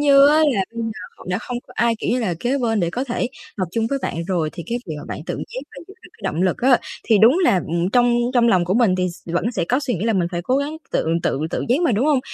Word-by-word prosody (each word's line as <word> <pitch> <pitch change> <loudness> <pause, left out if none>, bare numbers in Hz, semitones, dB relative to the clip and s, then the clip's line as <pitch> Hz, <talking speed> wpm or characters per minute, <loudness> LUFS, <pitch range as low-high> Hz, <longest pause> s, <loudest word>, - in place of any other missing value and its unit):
như 280 -1 +7
á, 300 - +4
là 285 -11 +3
bây 230 - -3
giờ 225 - -2 0.4
h - - -11
đã 180 - 0
không 245 +1 -5
có - - -15
ai, 235 -1 +2
kiểu - - -2
như 250 - +1
là, 185 -7 -1
kế 260 +3 0
bên 225 -4 0
để 170 -1 0
có 250 +7 -2
thể 245 -1 -1 0.3
học 185 -3 -1
chung 225 +2 0
với 275 +4 -1
bạn 165 - -3
rồi, 170 -4 0
thì 170 - -7
cái 235 +4 -2
việc 155 - -3
mà - - -8
bạn - - -5
tự - - -2
giác 255 - -6 0.2
và - - -9
giữ 390 - -12
được - - -14
cái - - -23
động 165 +4 -1
lực 185 - +1
á, 255 0 +4 0.3
thì 220 -3 +4
đúng 235 - +6
là, 345 - +3
ừm, 170 +3 -1
trong 245 0 +4 0.2
trong 235 -1 +4
lòng 185 -5 +3
của 180 +2 0
mình 225 -5 +4
thì 180 0 0
s 170 0 -12
vẫn 175 +7 0
sẽ 235 - -1
có 250 +9 +1
suy 270 -4 -1
nghĩ 190 +2 -3
là 225 - +2
mình 175 -3 +1
phải 175 0 -2
cố 255 +8 +1
gắng 290 +3 -2 0.2
tự - - 0 0.2
tự - - 0
tự - - -2
giác 255 +6 +3
mà, 305 -9 +3
đúng 235 +8 +1
không? 285 -4 +3
230 Hz, 315 wpm, -21 LUFS, 180-255 Hz, 0.4 s, như